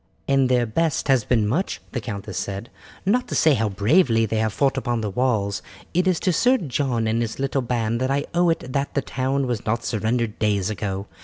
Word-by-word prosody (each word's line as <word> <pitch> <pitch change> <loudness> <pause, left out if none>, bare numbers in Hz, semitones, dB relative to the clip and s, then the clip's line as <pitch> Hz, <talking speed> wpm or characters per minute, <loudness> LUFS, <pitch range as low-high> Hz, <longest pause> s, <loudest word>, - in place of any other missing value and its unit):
"And 135 -2 +3
their 125 -1 +3
best 150 +6 0
has 130 -4 +4
been 110 -3 +1
much," 160 - -1
the 125 - -3
countess 105 -3 -6
said; 100 +3 -5 0.3
"not 245 +6 +2
to - - -4
say 155 - +5
how 110 -4 +1
bravely 115 - +3
they 110 0 -2
have 110 0 +1
fought 135 +5 +1
upon 120 -4 -1
the 105 -2 -2
walls, 105 -3 0 0.3
it 180 +2 +2
is 185 -3 +2
to 185 - +2
Sir 250 +10 +4
John 130 - -1
and 110 +1 +1
his 115 -2 -3
little 135 0 0
band 115 -1 -1
that 130 - 0
I 140 +2 0
owe 175 0 +3
it 130 -6 -2
that 140 0 -1
the 140 - +1
town 135 +1 -1
was 120 -4 -2
not 115 +2 -1
surrendered 110 0 -1
days 105 -2 +1
ago. 100 -2 -3
125 Hz, 220 wpm, -23 LUFS, 110-140 Hz, 0.3 s, say